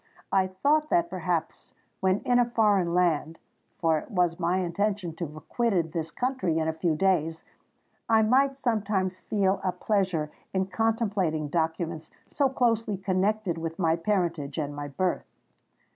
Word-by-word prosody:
I 190 -1 +3
thought 290 +12 +1
that, 345 -1 +2
perhaps, - - -3 0.2
when 190 +1 +1
in 245 0 +3
a 240 -1 +2
foreign 205 -7 +2
land,—for 165 -1 -1
it - - -12
was 180 -5 +1
my 175 +1 +1
intention 190 0 -1
to 170 - -3
have 155 +1 -12
quitted 195 -9 0
this 160 0 -3
country 195 - -1
in 160 -1 0
a 160 - 0
few 160 0 0
days,—I 185 +5 -1
might 270 +4 +3
sometimes 200 -7 -1
feel 195 -2 0
a 185 - +1
pleasure 185 -8 0 0.2
in 190 0 +2
contemplating 195 -7 0
documents 160 0 -2 0.2
so 280 -2 +1
closely 230 -5 +1
connected 190 -1 0
with 165 0 -4
my 165 -3 +2
parentage 165 -6 -1
and 145 -2 -3
my 145 0 -5
birth. 180 +6 -1
185 Hz, 145 wpm, -27 LUFS, 165-215 Hz, 0.2 s, I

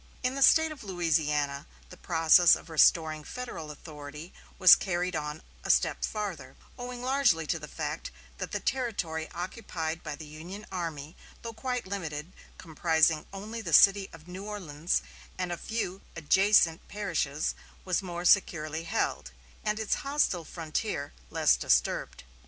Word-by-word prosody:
In 250 +1 +1
the 275 - -4
State 320 +4 +6
of 300 - -9
Louisiana 150 -6 0 0.2
the - - -10
process 165 0 +5
of 165 - -11
restoring 155 -1 +4
Federal 180 -8 -7
authority 150 +2 -10 0.2
was 185 -2 +9
carried 180 -1 -2
on 150 +1 -4 0.2
a - - -6
step - - +2
farther, 205 -8 -4 0.2
owing 245 0 -7
largely 255 -11 +2
to 165 +2 -1
the 150 - -8
fact 155 0 -4 0.3
that - - -4
the - - -2
territory 180 -11 -2
occupied 170 -3 -4
by 155 - -5
the 155 - -10
Union 170 +8 -9
army, 165 -4 -5 0.3
though 230 -1 -5
quite 250 0 -3
limited, 170 -4 -5 0.2
comprising 160 -1 +1
only 215 +4 -6
the - - -5
city 195 -1 +6
of 165 0 -14
New 185 +2 -7
Orleans 175 -6 -2 0.3
and 180 -1 -2
a - - -1
few 195 -1 -4
adjacent 170 +1 +3
parishes, 165 -8 -2 0.3
was 185 0 +1
more 175 -2 -5
securely 160 -4 +2
held, 65 - -1 0.3
and 210 +1 -1
its 220 - 0
hostile 275 - 0
frontier 160 -1 -4 0.2
less - - +3
disturbed. - - 0
175 Hz, 145 wpm, -29 LUFS, 155-205 Hz, 0.3 s, was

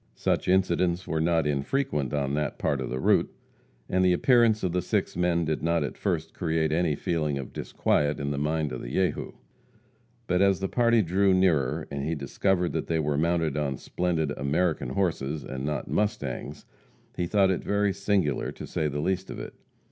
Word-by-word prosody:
Such - - 0
incidents 90 -1 +2
were 80 -1 0
not 80 -1 +2
infrequent 75 - -1
on 70 -2 -1
that 75 -1 -1
part 70 -2 0
of 65 - -4
the 65 - -3
route, - - +3 0.6
and 95 0 +1
the 90 -1 +4
appearance 115 +2 +4
of 90 - 0
the 90 +1 0
six - - -1
men 85 -1 +1
did 75 0 -1
not 85 +1 +1
at - - -4
first 80 -4 -2
create 80 -3 0
any 80 -1 +1
feeling 75 -2 -1
of 65 -2 -7
disquiet 75 0 0
in 70 0 -2
the 70 - -2
mind 75 0 -1
of 65 - -5
the - - -7
Jehu. 95 +4 -1 0.9
But 90 +1 +1
as 100 -1 +4
the 95 - -1
party 115 0 +3
drew 95 +2 +3
nearer, 80 -5 +2
and 70 -1 -3
he 80 +3 -1
discovered 90 +3 0
that - - -2
they 85 - 0
were 75 -2 0
mounted 80 -1 +1
on 70 -3 -1
splendid 80 -2 -1
"American 75 -1 0
horses," 75 -3 -1
and 65 +1 -5
not 75 -3 -2
"mustangs," 75 -7 -2 0.5
he 90 - -1
thought 95 0 +3
it 95 - -2
very 100 -1 +1
singular, 100 -7 0
to - - -8
say 75 - -1
the 75 0 -2
least 95 +3 -1
of - - -6
it. - - -7
80 Hz, 195 wpm, -27 LUFS, 75-95 Hz, 0.9 s, the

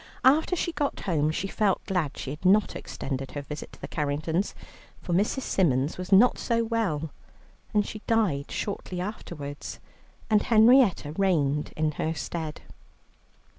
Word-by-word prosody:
After 310 +7 +5
she 340 - -1
got 290 -3 -2
home, 155 -5 +1
she 170 +5 -2
felt 200 -1 0
glad 175 -7 -1
she 135 - -5
had 150 +4 -8
not 200 +3 +4
extended 135 -1 -5
her 145 - -4
visit 150 +2 -7
to - - -15
the - - -5
Carringtons, 155 +5 -1 0.4
for 175 - -4
Mrs. 210 +8 +1
Symons 145 -4 +1
was 185 +2 -6
not 210 +6 +6
so 230 -1 +1
well, 200 -10 -1 0.6
and 210 -2 +2
she 215 - -7
died 195 -12 +1
shortly 190 -3 -4
afterwards, 170 -7 -6 0.5
and 215 -1 +4
Henrietta 225 - +5
reigned 150 -5 +1
in 155 0 +1
her 160 +2 -2
stead. 160 0 -5
180 Hz, 150 wpm, -27 LUFS, 150-215 Hz, 0.6 s, not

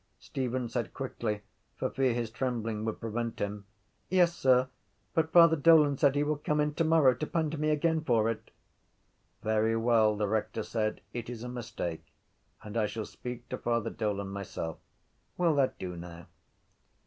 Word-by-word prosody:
Stephen 130 -2 -3
said 120 0 -3
quickly 110 -5 -3 0.3
for - - 0
fear 135 -2 +2
his 115 -1 -2
trembling 115 -3 -2
would 110 -1 -3
prevent 115 0 -3
him: 100 0 -4 0.4
—Yes, 175 -2 +4
sir, 130 -3 +4 0.5
but 160 -2 +1
Father 170 -2 +7
Dolan 150 -1 +6
said 140 0 +3
he 145 - +2
will 150 0 0
come 150 +1 -1
in 150 0 +1
tomorrow 160 -4 +4
to 140 +5 -4
pandy 160 -2 -1
me 155 +1 0
again 160 +1 +2
for 115 -6 +2
it. 115 -1 -3 0.9
—Very 110 +1 +2
well, 115 -2 +3
the 105 0 0
rector 110 +1 -1
said, 110 -1 -2
it 120 -1 -5
is 120 -2 -6
a - - -5
mistake 110 -9 -5 0.6
and 105 +2 -5
I 110 -2 +2
shall 110 0 -4
speak 125 -1 -8
to - - -4
Father 115 -1 0
Dolan 100 -3 -2
myself. 95 -4 -5 0.6
Will 175 -3 +3
that 135 -2 +2
do 90 -1 -5
now? 85 -1 -9
120 Hz, 170 wpm, -30 LUFS, 110-145 Hz, 0.9 s, Father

